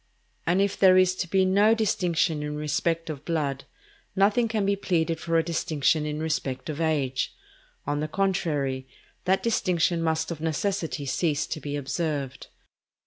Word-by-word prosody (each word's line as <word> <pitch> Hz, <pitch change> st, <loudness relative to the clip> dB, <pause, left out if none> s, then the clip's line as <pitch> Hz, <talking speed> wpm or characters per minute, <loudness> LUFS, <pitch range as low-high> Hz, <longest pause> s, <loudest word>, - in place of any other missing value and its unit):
And 180 Hz, +3 st, +3 dB
if 200 Hz, -, -2 dB
there 185 Hz, -1 st, +7 dB
is 185 Hz, 0 st, +4 dB
to 175 Hz, -, -2 dB
be 190 Hz, +1 st, +3 dB
no 205 Hz, +4 st, +4 dB
distinction 175 Hz, -7 st, +1 dB
in 150 Hz, 0 st, -4 dB
respect 155 Hz, +3 st, -1 dB
of 145 Hz, -2 st, -8 dB
blood, 145 Hz, -5 st, -2 dB, 0.5 s
nothing 205 Hz, +4 st, +3 dB
can 220 Hz, -3 st, -1 dB
be 200 Hz, 0 st, +2 dB
pleaded 165 Hz, -4 st, 0 dB
for 165 Hz, -1 st, 0 dB
a 165 Hz, -, +3 dB
distinction 160 Hz, -2 st, 0 dB
in 150 Hz, 0 st, -3 dB
respect 150 Hz, -4 st, -2 dB
of 155 Hz, +2 st, -5 dB
age. 140 Hz, -5 st, 0 dB, 0.5 s
On 145 Hz, 0 st, -1 dB
the 155 Hz, -, -1 dB
contrary, 150 Hz, -8 st, -1 dB, 0.4 s
that 190 Hz, +1 st, +2 dB
distinction 180 Hz, -6 st, +1 dB
must 160 Hz, 0 st, 0 dB
of 155 Hz, -2 st, -6 dB
necessity 165 Hz, -1 st, -2 dB
cease 150 Hz, +2 st, 0 dB
to -, -, -5 dB
be 145 Hz, 0 st, -4 dB
observed. 140 Hz, -2 st, -3 dB
165 Hz, 160 wpm, -26 LUFS, 150-185 Hz, 0.5 s, there